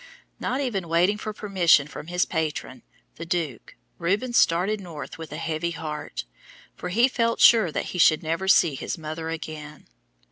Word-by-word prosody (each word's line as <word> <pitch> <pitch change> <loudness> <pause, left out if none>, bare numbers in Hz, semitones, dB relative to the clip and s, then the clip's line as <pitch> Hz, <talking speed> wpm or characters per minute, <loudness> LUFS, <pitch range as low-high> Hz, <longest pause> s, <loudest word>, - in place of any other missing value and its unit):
Not 255 - -2
even 195 -10 -2
waiting 180 +5 +2
for 215 - -4
permission 185 -8 +3
from 145 0 -9
his 180 +1 +1
patron, 155 -6 -3 0.4
the 170 - -6
Duke, 165 - -3 0.2
Rubens 210 +8 0
started 195 +4 +3
north 165 -3 -8
with 160 - -8
a - - -5
heavy 160 +1 -2
heart, 150 - -5 0.5
for 180 - -6
he 235 +7 +4
felt 230 -3 0
sure 220 -8 +6
that - - -2
he 180 - -4
should 155 -1 +5
never 165 +4 -2
see 170 -5 +5
his 135 - -4
mother 160 +1 -5
again. 155 -2 -7
170 Hz, 170 wpm, -25 LUFS, 155-195 Hz, 0.5 s, sure